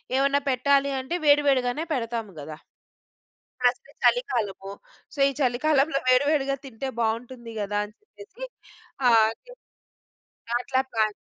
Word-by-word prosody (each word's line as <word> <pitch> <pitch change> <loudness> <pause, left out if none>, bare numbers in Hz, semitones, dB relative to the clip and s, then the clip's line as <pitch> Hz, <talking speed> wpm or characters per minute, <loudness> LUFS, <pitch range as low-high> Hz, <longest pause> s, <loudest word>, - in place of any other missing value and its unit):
ఏమన్నా 275 +1 +2
పెట్టాలి 280 +2 +2
అంటే 260 +7 -4
వేడి 295 0 +6
వేడిగానే 255 +2 +1
పెడతాము 230 -5 -3
కదా! 150 +1 -8 1.0
ప్లస్ 250 0 +2 0.2
చలికాలము. 215 - +1 0.4
సో - - -14
ఈ - - 0
చలికాలంలో 275 +3 +2
వేడి 255 +2 +5
వేడిగా 275 -3 +1
తింటే 265 0 -6
బాగుంటుంది 230 +1 -3
కదా 205 0 -2
అని 210 +1 -12
చెప్పేసి 425 +2 -15 0.7
ఆహ్, 225 -2 +6
అట్లా - - -18 0.9
అట్లా 260 0 0
ప్లాన్ 215 -2 +1
255 Hz, 120 wpm, -25 LUFS, 230-280 Hz, 1.0 s, వేడి